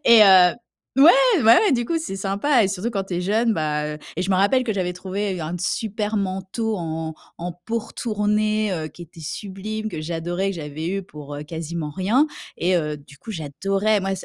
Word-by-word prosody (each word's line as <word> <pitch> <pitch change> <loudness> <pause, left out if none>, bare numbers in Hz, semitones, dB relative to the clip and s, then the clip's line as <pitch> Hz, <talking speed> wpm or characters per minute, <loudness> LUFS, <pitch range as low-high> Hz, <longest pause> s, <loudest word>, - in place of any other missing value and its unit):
et 235 -1 +8
et, - - +11
heu, 185 -3 +7 0.5
ouais. 335 - +10 0.3
Bah 225 +2 +8
ouais, 415 -7 +3
du 240 -2 +1
coup, 330 +6 0
c'est 315 -12 -5
sympa 205 +6 +2
et 190 - +1
surtout 200 +3 -2
quand 195 -3 -1
tu 190 - -5
es - - -1
jeune. 220 +5 +2
Bah, 150 -2 -1 0.2
et 180 - 0
je 185 - -2
me 190 - +4
rappelle 230 +7 +3
que 225 - 0
j'avais 180 -3 -2
trouvé 190 +1 -3
un 160 +3 -4
super 215 +2 -1
manteau 195 +3 -2
en 160 -2 -4 0.3
en 175 +1 -4
peau 225 +7 -3
retournée, 215 -1 0
heu, 160 -3 -3
qui 175 - -12
était 170 0 -13
sublime, 205 +6 -5
que 155 - -5
j'adorais, 175 +4 -2
que 195 - -5
j'avais 155 +1 -5
eu 195 +1 -2
pour, 150 -5 -10
heu, 145 - -5
quasiment 160 0 -5
rien 210 - +2 0.3
et, 180 +2 +2
heu, 150 -2 -2
du 145 0 -16
coup 225 - -9
j'adorais. 195 +5 0
Moi 195 0 -1
c 185 - -8
190 Hz, 215 wpm, -23 LUFS, 165-215 Hz, 0.5 s, et